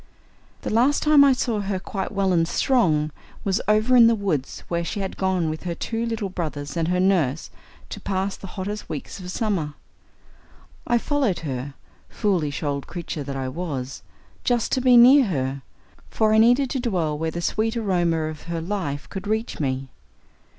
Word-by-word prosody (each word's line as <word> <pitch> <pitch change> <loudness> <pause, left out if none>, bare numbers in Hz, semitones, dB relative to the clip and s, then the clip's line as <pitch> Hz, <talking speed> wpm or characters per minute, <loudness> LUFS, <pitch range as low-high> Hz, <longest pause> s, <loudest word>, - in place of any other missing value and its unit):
The - - -3
last 255 +6 +3
time 300 -2 +7
I 280 - +6
saw 240 -4 0
her 200 -1 -2
quite 195 0 -4
well 195 -2 +1
and 165 -1 +2
strong 160 - +2 0.3
was 195 -1 0
over 215 +4 +3
in 235 -2 +8
the 230 - +4
woods 185 -11 -2
where 170 0 -1
she 205 +5 -4
had 195 -1 -4
gone 185 -3 0
with 155 0 -3
her 175 -2 -4
two 230 +6 -3
little 225 -3 -2
brothers 150 -5 -5
and 165 -1 0
her 180 +1 +1
nurse 170 -7 +1 0.4
to - - -6
pass 195 0 -1
the 195 - -10
hottest 205 +2 -4
weeks 150 +5 -6
of 180 -1 -8
summer. 180 -8 -1 1.1
I 240 - +3
followed 260 - 0
her, 135 -2 -5 0.3
foolish 170 -10 -1
old 140 -2 -2
creature 170 -3 -5
that 140 0 -5
I 135 -1 -3
was, 135 -3 -5 0.4
just 240 -2 +1
to 260 - +1
be 250 -1 +6
near 260 +3 +8
her, 135 -7 -2 0.5
for 215 -1 +2
I 220 - +5
needed 245 +4 +4
to 270 - -1
dwell 180 - -1
where 160 +2 -2
the 170 - -5
sweet 220 +6 0
aroma 175 -7 +1
of 155 -1 -5
her 170 -1 -2
life 165 -6 -3
could 195 +1 -7
reach 220 +2 -2
me. 135 -2 -2
185 Hz, 185 wpm, -23 LUFS, 155-220 Hz, 1.1 s, in